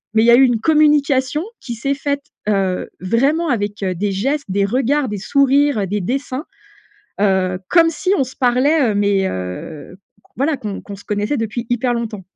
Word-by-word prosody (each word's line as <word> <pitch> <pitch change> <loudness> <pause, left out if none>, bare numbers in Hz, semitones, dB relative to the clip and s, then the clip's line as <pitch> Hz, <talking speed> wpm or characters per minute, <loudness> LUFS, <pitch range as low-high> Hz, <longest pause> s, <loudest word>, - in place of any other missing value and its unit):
Mais 220 - +5
il - - +3
y 235 - +6
a - - +8
eu 265 - +6
une 245 -4 +2
communication, 295 -1 +2 0.2
qui 240 - -6
s'est 275 +5 -1
faite, 280 0 -3 0.2
heu, 195 -3 0
vraiment, 275 - +1
avec, 205 -4 -2
heu, 185 -1 0
des 200 +3 -2
gestes, 275 +9 -1
des 200 +1 +1
regards, 265 +6 +1
des 205 -2 -4
sourires, 280 +3 +2
heu, - - 0
des 205 +2 -2
dessins, 265 - -3 0.8
heu, 185 -2 +1
comme 335 -1 +5
si 365 +4 -2
on - - +2
se 260 - -12
parlait, 260 +2 +2
heu, 205 - -3
mais 200 -1 +2
heu, 95 - -7 0.4
voilà 280 +2 0
qu'on 205 -3 -6
qu'on 200 - -9
se - - -16
connaissait 210 +7 -1
depuis 225 +1 -3
hyper 245 0 0
longtemps. 220 -5 -4
240 Hz, 195 wpm, -18 LUFS, 200-280 Hz, 0.8 s, a